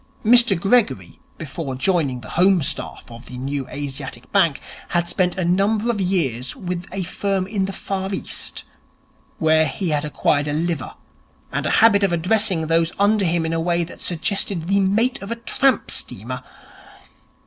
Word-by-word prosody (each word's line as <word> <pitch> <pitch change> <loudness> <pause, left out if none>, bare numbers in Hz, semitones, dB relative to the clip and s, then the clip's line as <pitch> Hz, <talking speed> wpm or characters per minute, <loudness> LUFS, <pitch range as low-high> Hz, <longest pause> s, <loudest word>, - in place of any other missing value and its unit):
Mr 240 -4 +5
Gregory, 170 - +1 0.2
before 145 -3 -5
joining 135 -3 0
the 110 - -10
home 185 -1 +3
staff - - -1
of 115 +1 -11
the 125 - -8
New 135 +1 -3
Asiatic 135 -3 -6
Bank, 170 -8 +3 0.3
had 175 -1 0
spent 180 +1 0
a 185 - 0
number 205 +6 +2
of 210 -4 -3
years 145 -10 -1
with 180 -1 -5
a 190 0 -3
firm 190 +1 -1
in 195 -1 -1
the 195 - -4
Far 195 0 -4
East, 190 - -4 0.7
where 160 0 +3
he 180 +5 -3
had 150 -1 0
acquired 150 -1 0
a 145 - -1
liver 165 +1 -2 0.6
and - - -1
a - - +3
habit 205 -3 +5
of 195 -3 +2
addressing 180 0 +2
those 165 +1 +2
under 205 0 +3
him 170 -1 +1
in 160 - -1
a 165 - 0
way 170 0 +1
that 170 - -10
suggested 180 0 0
the 200 +1 +3
mate 225 +7 +1
of 195 - -7
a 230 - -2
tramp 260 +3 +1
steamer. - - -4
175 Hz, 170 wpm, -21 LUFS, 155-195 Hz, 0.7 s, Mr